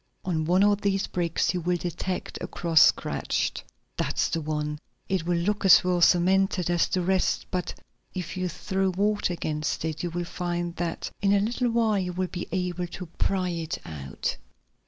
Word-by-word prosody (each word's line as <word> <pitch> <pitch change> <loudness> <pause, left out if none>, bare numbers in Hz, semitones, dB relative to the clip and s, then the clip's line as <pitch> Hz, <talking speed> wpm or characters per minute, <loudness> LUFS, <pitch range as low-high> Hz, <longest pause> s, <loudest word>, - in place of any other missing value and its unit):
On 160 -4 0
one 180 +4 +4
of 205 0 +3
these 195 -1 +1
bricks 170 -1 0
you 180 - -2
will 175 +1 +1
detect 175 +2 -4
a - - -3
cross 165 -2 +3
scratched. - - +2 0.3
That's - - 0
the 165 - -1
one. 150 -1 -2 0.3
It 185 -4 -1
will 175 -1 +2
look 205 +5 0
as 190 -1 +8
well 180 -1 +1
cemented 185 +1 +3
as 175 -1 +3
the 185 - 0
rest, 190 +1 +1
but 180 -1 -2 0.4
if 180 -2 -4
you 185 -1 -1
throw 190 +2 -1
water 205 +1 +1
against 155 -2 -2
it, 160 -1 -3
you 175 - -2
will 175 +1 -3
find 175 0 -3
that 170 -2 -3
in 200 -1 +3
a 200 - +4
little 240 +4 0
while 225 -3 +2
you 180 -1 -2
will 185 0 -2
be 175 - -5
able 180 -1 -2
to 180 +1 -7
pry 185 +2 -1
it 165 -2 -3
out. 70 -4 -4
180 Hz, 185 wpm, -26 LUFS, 170-190 Hz, 0.4 s, as